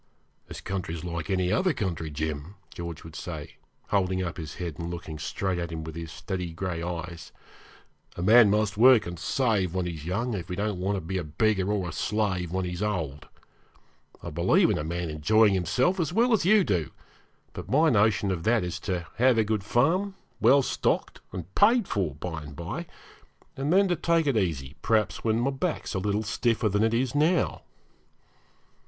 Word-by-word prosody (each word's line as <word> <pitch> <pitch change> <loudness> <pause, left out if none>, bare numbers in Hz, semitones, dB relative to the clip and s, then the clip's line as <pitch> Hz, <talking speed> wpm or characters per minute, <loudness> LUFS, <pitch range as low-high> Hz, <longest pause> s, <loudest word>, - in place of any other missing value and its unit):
'This - - -8
country's 85 -4 -4
like 85 -3 -4
any 95 -1 +1
other 185 -2 +2
country, 90 - -3
Jim,' 75 +4 -4 0.2
George 85 -2 -7
would 80 -1 -11
say, 80 -2 -7 0.3
holding 95 -2 +1
up 85 -4 -4
his 80 -3 -7
head, 85 -3 -5
and 85 0 -4
looking 80 -3 -6
straight 95 +3 -2
at 85 -1 -4
him 80 -1 -5
with 80 0 -7
his 85 -1 -6
steady 90 -4 -5
gray 85 0 -3
eyes; 85 -1 -6 0.8
'a 85 - -4
man 110 +2 +7
must 105 -1 +1
work 125 0 +7
and 85 -1 -6
save 100 -5 0
when 90 -1 0
he's 80 -4 -5
young 115 +9 -2
if 90 -3 -5
he 90 - -3
don't 105 -1 -2
want 100 +2 0
to 95 - -3
be 95 +3 -3
a - - -3
beggar 95 +5 +1
or 100 -4 -1
a - - -5
slave 95 +1 -1
when 95 0 -1
he's 90 +1 -4
old. 80 -9 -3 1.0
I 85 - -5
believe 85 +3 +3
in - - 0
a - - -2
man 85 +1 -3
enjoying 105 +8 +4
himself 125 - +1
as 160 -3 0
well 235 +5 +3
as 205 -6 +2
you 210 0 +6
do, 90 - 0 0.6
but - - -8
my 155 +4 +4
notion 105 -2 +3
of 90 -3 -2
that 115 +3 +2
is 90 +1 -4
to 90 -3 -3
have 125 0 +4
a 110 - +4
good 105 -2 -1
farm, 175 - +1 0.2
well 140 0 +5
stocked - - -1
and 90 0 -7
paid 225 +1 +4
for, 90 -9 -1
by 80 +1 -5
and 75 -1 -10
by, 85 +2 -5 0.7
and 140 +3 -2
then 195 +2 +5
to 175 - +2
take 165 0 +1
it 140 -4 +1
easy, 80 -10 -1
perhaps 110 -2 +1
when 110 0 +1
my 130 +3 +1
back 155 +5 -2
is - - -4
a 95 - -1
little 105 +2 0
stiffer 115 +1 0
than 105 +2 +1
it 115 +1 +2
is 125 +1 0
now.' 155 +4 +2
95 Hz, 200 wpm, -27 LUFS, 85-115 Hz, 1.0 s, man